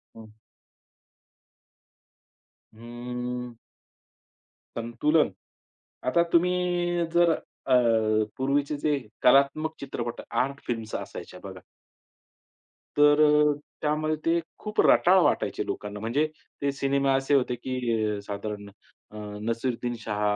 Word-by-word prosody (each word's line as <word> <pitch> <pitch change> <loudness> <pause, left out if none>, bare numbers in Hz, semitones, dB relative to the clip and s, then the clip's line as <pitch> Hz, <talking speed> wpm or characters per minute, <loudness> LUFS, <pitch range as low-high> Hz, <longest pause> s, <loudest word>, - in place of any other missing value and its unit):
हं. 110 -1 -12 2.4
हम्म. 125 +1 -6 1.2
संतुलन. 150 +7 +1 0.8
आता 170 +7 +4
तुम्ही 175 0 +2
जर 170 -1 +5 0.4
अ, - - +4 0.6
पूर्वीचे 140 +2 0
जे 150 -1 +2 0.3
कलात्मक 140 +4 +4
चित्रपट, 120 -3 -5
आर्ट 140 +2 0
फिल्म्स 115 -3 -4
असायच्या - - -7
बघा. - - -8 1.4
तर 145 0 +6
अ, 150 0 +5 0.3
त्यामध्ये 155 +1 0
ते 170 +1 +3 0.2
खूप 210 0 -5
रटाळ 185 +2 +5
वाटायचे 145 - 0
लोकांना. 105 0 -5
म्हणजे 120 +8 +1 0.4
ते 140 0 +1
सिनेमे 140 0 0
असे 135 +1 +2
होते, 125 -2 +1
की 115 -4 -1
साधारण 105 0 -5 0.4
अ, 105 - -10 0.2
नसीरुद्दीन 120 +2 -2
शाह, 105 -2 -4
135 Hz, 95 wpm, -26 LUFS, 115-150 Hz, 2.4 s, तर